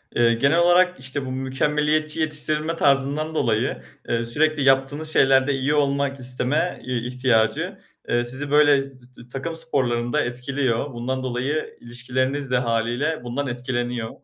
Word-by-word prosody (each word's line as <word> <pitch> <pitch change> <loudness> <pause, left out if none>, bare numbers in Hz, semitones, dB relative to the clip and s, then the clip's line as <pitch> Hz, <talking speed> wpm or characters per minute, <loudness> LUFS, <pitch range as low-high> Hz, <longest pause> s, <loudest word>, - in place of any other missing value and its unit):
Eee, 120 -1 +4
genel 140 +8 +2
olarak, 180 0 +4
işte, 130 +1 -4
bu 130 - -5
mükemmeliyetçi 150 +4 0
yetiştirilme 155 +1 +1
tarzından 145 +2 +1
dolayı, 115 -6 0 0.3
ııı, 115 0 0
sürekli 150 +4 +1
yaptığınız 140 +4 +2
şeylerde 135 +1 +4
iyi 135 +2 0
olmak 140 -1 0
isteme 130 +7 -1
i 125 -1 -3
ihtiyacı, 120 -3 +1 0.3
eee, 120 0 +2
sizi, 140 +4 -2
böyle, 145 -2 +5
t 135 0 -12 0.4
takım 165 +5 -4
sporlarında 130 -5 0
etkiliyor. 125 +1 -2
Bundan 130 +2 -3
dolayı 130 +5 -3
ilişkileriniz 130 +3 -3
de 125 - +3
hâliyle 120 +5 -1
bundan 130 +4 -3
etkileniyor. 120 -2 -3
135 Hz, 135 wpm, -23 LUFS, 125-150 Hz, 0.4 s, böyle